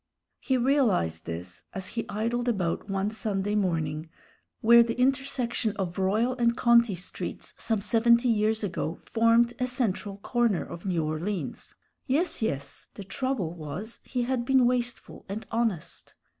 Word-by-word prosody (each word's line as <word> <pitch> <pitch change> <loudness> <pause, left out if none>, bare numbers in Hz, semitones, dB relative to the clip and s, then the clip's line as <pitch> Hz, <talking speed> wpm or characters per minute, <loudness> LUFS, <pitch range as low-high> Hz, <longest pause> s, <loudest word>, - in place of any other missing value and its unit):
He 260 -2 +1
realized 230 - +1
this, 90 +2 -6
as 190 -1 -3
he 230 - -4
idled 235 +3 -1
about 195 -4 -1
one 195 +1 0
Sunday 205 -2 -2
morning 165 -6 -1 0.5
where 235 +1 +8
the 235 +1 0
intersection 255 -4 0
of 185 -1 -3
Royal 215 +7 +2
and 235 0 +2
Conti 235 -4 +4
Streets 180 - -6
some 220 -3 -1
seventy 235 +2 +4
years 220 -1 +2
ago 175 -4 -2
formed 230 +1 +3
a 250 - +1
central 215 -5 -2
corner 235 -2 +1
of 170 +3 -8
New 170 -4 0
Orleans. 170 +6 -4 0.3
Yes, 300 +4 +1
yes, 140 -10 -3
the 200 - -7
trouble 200 -4 -2
was 175 +8 -7
he 250 -2 -2
had 250 0 0
been 260 0 +4
wasteful 245 -1 -1
and 210 +3 -5
honest. 225 -8 -2
220 Hz, 145 wpm, -27 LUFS, 190-240 Hz, 0.5 s, where